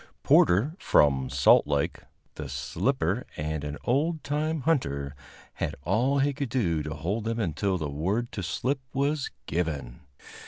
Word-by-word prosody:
Porter, 110 - +4
from 65 -3 +3
Salt 70 +1 +5
Lake, 70 -1 0 0.3
the 75 -3 -7
slipper 70 0 -1
and 75 0 -3
an 75 0 -4
old 155 +6 +1
time 150 +2 -1
hunter, 70 - 0 0.4
had - - -3
all 120 - +2
he 140 +1 +2
could 140 -2 -3
do 90 -11 +1
to 75 0 -5
hold 100 +9 -2
them 115 +1 -1
until 95 0 0
the 75 -3 -3
word 95 +12 -1
to 100 - -4
slip 130 +9 -1 0.2
was 140 +1 0 0.2
given. 75 -8 -3
95 Hz, 150 wpm, -27 LUFS, -, 0.4 s, Salt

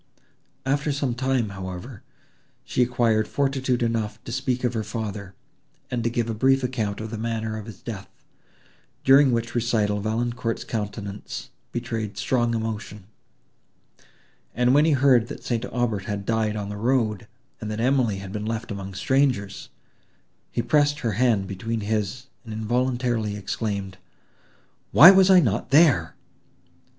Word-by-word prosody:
After 140 +2 0
some 140 -3 -1
time, 130 -2 0
however, 95 +4 -7 0.6
she - - -1
acquired 115 -3 +2
fortitude 135 -3 0
enough 110 -2 -1
to - - -7
speak 130 0 -1
of 125 -1 +1
her 110 -2 -2
father, 105 -3 -5 0.6
and 120 -2 -1
to 120 - +1
give 120 -1 -1
a 115 - -2
brief 135 +4 +3
account 110 -5 -2
of 110 0 -6
the 110 - -5
manner 110 -1 -2
of 110 0 -7
his 110 - -11
death; - - -7 0.9
during 135 0 +6
which 115 0 -1
recital 110 -3 +1
Valancourt's 115 +2 -2
countenance 105 -2 -5 0.2
betrayed 115 -3 -4
strong 120 -2 +1
emotion, 110 -2 -4 1.5
and, 125 +1 +3
when 145 +2 +5
he 160 - +3
heard 130 -4 +4
that - - -8
St. 120 -1 -1
Aubert 115 -6 -1
had 100 -1 -4
died 110 -1 0
on 100 -1 -4
the 105 - -5
road, 115 -2 0 0.3
and 110 - -5
that 110 0 -4
Emily 125 -3 +2
had 95 -1 -8
been 105 +1 -4
left 115 0 -3
among 95 -1 -6
strangers, 125 -2 0 0.8
he 120 - -1
pressed 145 +2 +2
her 115 - 0
hand 110 -2 +2
between 110 +4 -4
his, 110 +3 -2 0.2
and 115 - -9
involuntarily 120 -1 0
exclaimed, 100 -2 -4 0.9
"Why 165 +7 +10
was 190 -1 +5
I 185 -2 +8
not 115 - -1
there!" 135 - +4
115 Hz, 150 wpm, -24 LUFS, 105-125 Hz, 1.5 s, Why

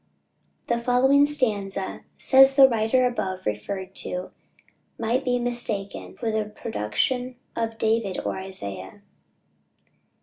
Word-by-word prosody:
The 235 0 0
following 265 +4 +4
stanza, 205 -9 -1
says 270 0 +6
the 270 -1 +9
writer 235 +1 +2
above 190 -7 -2
referred 185 - -4
to, 180 0 -4 0.7
might 235 +4 0
be 250 -2 +1
mistaken 240 -5 -3
for 230 -2 -2
the 215 -1 0
production 210 - -2 0.2
of 225 -1 -2
David 220 -4 0
or - - -1
Isaiah. 100 - -7
225 Hz, 110 wpm, -25 LUFS, 190-250 Hz, 0.7 s, the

